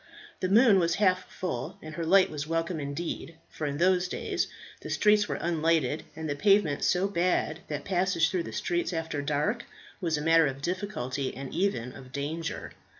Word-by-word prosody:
The 185 - -1
moon 215 -1 +6
was 170 -1 +2
half 185 -2 +2
full, 165 -10 -4
and 155 0 -9
her 165 +2 -3
light 185 +3 +5
was 150 -1 -4
welcome 165 +1 -1
indeed, 160 +3 -4 0.2
for 155 - -3
in 140 0 -3
those 180 +2 +3
days - - -2 0.3
the - - -8
streets 210 -1 +4
were - - -2
unlighted, 160 -3 +1
and 160 0 -5
the 145 - -1
pavement 195 -4 +3
so 185 +2 +2
bad 175 -4 0
that 145 -1 -4
passage 180 -3 +2
through 185 - 0
the - - -6
streets 175 +1 -1
after 160 -3 -2
dark 150 - 0 0.4
was 165 -4 0
a - - -3
matter 165 0 +5
of 135 +1 -5
difficulty, 150 -8 -3
and 135 -1 -6
even 125 -11 -1
of 130 -1 -12
danger. 155 +4 -4
165 Hz, 185 wpm, -28 LUFS, 150-185 Hz, 0.4 s, moon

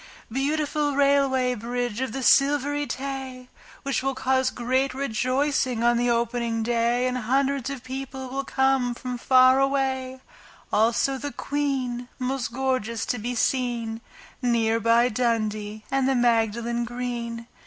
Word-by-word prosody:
Beautiful 290 +2 0
Railway 275 -3 +3
Bridge 240 0 -3
of 260 -3 -2
the 265 +3 -4
Silvery 290 +2 +3
Tay! 265 -2 -5 0.3
Which 275 -1 -1
will 270 0 -1
cause 260 0 +1
great 255 +2 -1
rejoicing 255 -1 0
on 240 0 +4
the 240 +1 +1
opening 235 -1 0
day 235 +1 +1
And 255 0 -1
hundreds 270 +2 0
of 275 -3 -6
people 265 0 -6
will 270 +2 -3
come 265 -3 +1
from 250 0 -5
far 255 +1 +5
away, 265 -1 0 0.5
Also 235 +5 +2
the 285 +2 -4
Queen, 265 -5 -2
most 255 -1 -2
gorgeous 250 -3 -1
to 245 - -2
be 245 +3 -3
seen, 235 -2 -1 0.4
Near 230 -2 +2
by 230 +2 +4
Dundee 215 -3 -1
and 270 -1 +2
the 270 - +2
Magdalen 235 0 +1
Green. 235 -1 -4
255 Hz, 135 wpm, -25 LUFS, 235-270 Hz, 0.5 s, far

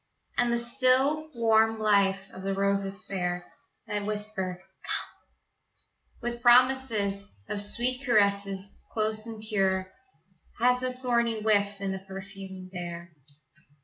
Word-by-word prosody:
And 240 -1 +2
the 235 - +2
still, 260 +5 +3
warm 225 -1 +3
life 200 -3 +3
of 190 - -9
the 195 0 -2
roses 195 -1 0
fair 180 -2 -3 0.4
That 210 -2 -3
whisper 205 -3 -3 0.2
"Come," - - -8 0.5
With 240 0 -3
promises 240 -5 +3 0.2
Of 205 - -3
sweet 245 +5 -1
caresses, 200 -4 +1
close 215 0 +1
and 225 -1 -7
pure 190 -3 +1 0.7
Has 250 +1 +3
a 255 0 -1
thorny 235 -3 0
whiff 205 -2 +2
in 195 -1 -2
the 190 - -4
perfumed 190 -1 -9
air. 175 -1 -6
210 Hz, 120 wpm, -28 LUFS, 195-235 Hz, 0.7 s, still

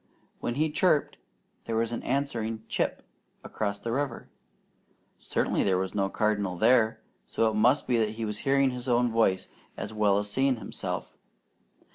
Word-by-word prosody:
When 120 - -2
he 155 +2 +1
"chipped" 155 -1 +2 0.5
there 115 - -2
was 115 +1 0
an 120 - -3
answering 115 -5 -2
"Chip" - - -1 0.4
across 100 -1 -3
the 115 +3 -5
river; 135 -1 -3 0.9
certainly - - 0
there 95 -2 +2
was 95 0 -2
no 100 -2 0
cardinal 105 -4 0
there, 110 +1 +4 0.3
so 115 - +1
it 110 - 0
must 120 +7 +3
be 120 -2 +2
that 110 -1 +2
he 115 0 -3
was 105 -1 -4
hearing 135 -1 +2
his 125 +1 -5
own 120 0 +3
voice 95 -5 +2 0.3
as 105 - -5
well 105 -2 +3
as 105 0 0
seeing 130 +5 +2
himself. 115 - -5
115 Hz, 165 wpm, -28 LUFS, 105-125 Hz, 0.9 s, there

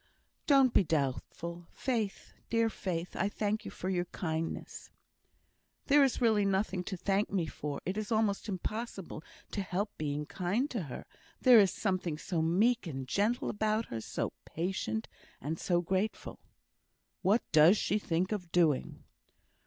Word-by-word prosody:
"Don't 270 -4 +5
be - - +5
doubtful, 165 +3 -2
Faith! 225 -6 -3 0.2
Dear 230 -1 +2
Faith, 175 -4 -4
I 200 - +1
thank 215 +1 -2
you - - -4
for 185 - -6
your 180 -2 0
kindness." 165 -2 -4 1.0
"There 285 0 +6
is 270 - +1
really 220 -4 +4
nothing 195 -1 0
to 190 - -4
thank 195 +3 +1
me 185 -4 +1
for. 150 -1 -5
It 185 +3 -2
is 215 +1 -5
almost 215 -1 +1
impossible 200 -2 -4 0.3
to 205 - -2
help 195 +2 -2
being 150 -1 -2
kind 195 - -1
to 230 - -2
her; - - -7 0.3
there 250 -3 +8
is 195 -2 +6
something 185 -6 -1
so 165 +1 -2
meek 200 +7 +2
and 135 -4 -5
gentle 210 - +1
about 215 +1 0
her, 115 -1 -4
so - - -3
patient, 160 - -3 0.3
and 155 +5 -4
so 175 -1 +1
grateful!" 190 +5 -2 0.8
"What 205 +5 +3
does 160 +6 +7
she 210 - +1
think 180 0 -1
of 180 -5 -3
doing?" 160 -6 +1
190 Hz, 155 wpm, -32 LUFS, 165-215 Hz, 1.0 s, there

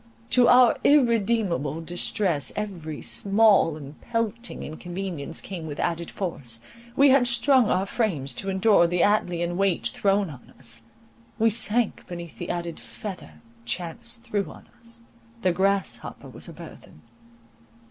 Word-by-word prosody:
To 245 -2 +5
our 245 -1 +6
irremediable 220 - +2
distress 170 - 0
every 175 -8 -5
small 200 -6 +4
and 145 0 -11
pelting 230 0 -3
inconvenience 175 -1 -6
came 175 -5 -6
with 145 - -6
added 170 0 -1
force; 135 - -4 0.4
we 280 +1 +6
had 260 -2 +5
strung 240 0 +4
our 185 +2 +1
frames 170 - 0
to 195 +11 -2
endure 190 -2 +4
the 175 0 0
Atlean 175 -4 +1
weight 190 -10 +1
thrown 195 -3 +1
on 125 -4 -14
us; 115 -3 -3 0.6
we 225 0 +3
sank 225 +1 0
beneath 170 -2 -8
the 175 - -5
added 170 -1 -3
feather 130 - -9 0.2
chance 175 - -3
threw 230 -4 -3
on - - -15
us, 230 0 -6 0.4
"the 185 - +4
grasshopper 195 +1 -1
was - - -7
a - - -9
burthen." 75 - -13
190 Hz, 135 wpm, -25 LUFS, 165-225 Hz, 0.6 s, our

